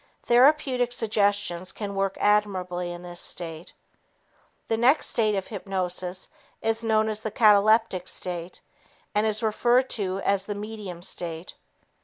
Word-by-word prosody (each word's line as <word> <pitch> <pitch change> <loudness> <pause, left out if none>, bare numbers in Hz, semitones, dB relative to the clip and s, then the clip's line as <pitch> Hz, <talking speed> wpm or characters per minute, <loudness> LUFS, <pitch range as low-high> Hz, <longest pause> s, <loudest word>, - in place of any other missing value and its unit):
Therapeutic 255 -1 +3
suggestions 205 -5 0
can 205 -2 -6
work 195 0 -1
admirably 185 -4 0
in 175 0 -8
this 175 0 -6
state. 165 -1 -3 1.0
The 225 - +1
next 250 +7 +3
stage 215 -2 +1
of 195 -1 -2
hypnosis 185 -2 -3 0.3
is 225 +1 0
known 220 -1 +2
as 215 -1 -2
the 220 - -3
cataleptic 210 -2 +4
state 175 -1 -4 0.5
and 210 +1 +2
is 215 +1 -2
referred 240 +4 +2
to 195 -3 -2
as 195 -1 +1
the 205 - -3
"medium" 205 -4 -7
state. 170 -1 -6
205 Hz, 135 wpm, -25 LUFS, 180-220 Hz, 1.0 s, cataleptic